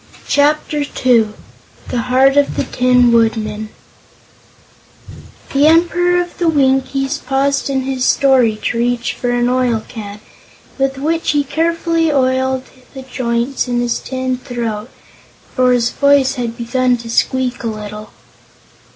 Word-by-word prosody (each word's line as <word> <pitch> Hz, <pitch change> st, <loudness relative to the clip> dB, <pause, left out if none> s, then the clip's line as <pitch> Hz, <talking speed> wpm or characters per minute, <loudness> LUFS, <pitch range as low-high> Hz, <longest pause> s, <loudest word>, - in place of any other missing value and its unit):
Chapter 295 Hz, +1 st, +1 dB
Two 235 Hz, -6 st, +1 dB, 0.5 s
The 245 Hz, -, -1 dB
Heart 265 Hz, +2 st, +4 dB
of 285 Hz, 0 st, +2 dB
the -, -, +1 dB
Tin 250 Hz, -1 st, +3 dB
Woodman 220 Hz, -2 st, 0 dB, 1.8 s
The 280 Hz, +2 st, +4 dB
Emperor 350 Hz, +2 st, +3 dB
of 350 Hz, 0 st, -4 dB
the 345 Hz, -2 st, +2 dB
Winkies 270 Hz, -2 st, +1 dB
paused 275 Hz, +2 st, -1 dB
in 270 Hz, -1 st, 0 dB
his 260 Hz, -1 st, -3 dB
story 255 Hz, -5 st, +3 dB
to 230 Hz, -, -1 dB
reach 240 Hz, 0 st, -1 dB
for 245 Hz, -, -3 dB
an 245 Hz, 0 st, +1 dB
oil 250 Hz, -3 st, 0 dB
can, 205 Hz, -3 st, -8 dB, 0.6 s
with 270 Hz, 0 st, 0 dB
which 320 Hz, +3 st, -1 dB
he 290 Hz, -1 st, +2 dB
carefully 330 Hz, +2 st, 0 dB
oiled 260 Hz, -1 st, +1 dB, 0.3 s
the 265 Hz, -, -7 dB
joints 250 Hz, 0 st, -2 dB
in 245 Hz, -1 st, -1 dB
his 240 Hz, -1 st, -1 dB
tin 255 Hz, -1 st, -3 dB
throat, 235 Hz, -3 st, -5 dB, 0.6 s
for 255 Hz, -1 st, +3 dB
his 245 Hz, -1 st, +1 dB
voice 280 Hz, -2 st, +3 dB
had 235 Hz, -3 st, -4 dB
begun 250 Hz, +1 st, 0 dB
to 235 Hz, 0 st, -10 dB
squeak 250 Hz, +2 st, -1 dB
a -, -, -2 dB
little. 210 Hz, -1 st, -7 dB
255 Hz, 135 wpm, -16 LUFS, 235-280 Hz, 1.8 s, Heart